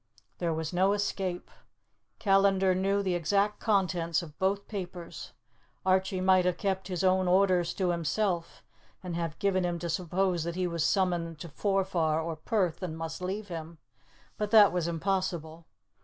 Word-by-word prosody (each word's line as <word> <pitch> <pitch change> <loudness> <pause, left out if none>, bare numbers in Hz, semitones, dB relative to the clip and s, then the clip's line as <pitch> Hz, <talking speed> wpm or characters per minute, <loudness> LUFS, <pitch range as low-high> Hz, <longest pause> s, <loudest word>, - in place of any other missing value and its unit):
There 170 -2 0
was 160 +1 -3
no 190 +3 +3
escape. 195 -3 -2 0.7
Callandar 195 -2 +3
knew 195 +2 +1
the 185 -2 0
exact 200 +5 +1
contents 180 -6 +1
of 155 -3 -11
both 195 +1 0
papers. 180 -4 -7 0.5
Archie 190 0 +2
might 185 0 +4
have 180 -1 0
kept 190 -1 -2
his 180 -2 -3
own 185 0 +3
orders 180 -2 +3
to 185 -3 +1
himself, 175 +1 -1 0.4
and 180 -2 -4
have 165 -2 -3
given 190 -2 +1
him 175 -1 -1
to 170 0 -4
suppose 180 +1 0
that 170 0 -4
he 185 0 0
was 170 -2 -1
summoned 175 -4 0
to 170 - -7
Forfar 185 -3 0
or 165 0 -3
Perth, 180 +1 -1
and 165 -4 -4
must 165 +1 -5
leave 200 +3 -4
him; 165 -1 -7 0.6
but 210 -1 -1
that 210 -2 +7
was 175 -2 0
impossible. 170 -2 -2
185 Hz, 160 wpm, -29 LUFS, 170-195 Hz, 0.7 s, that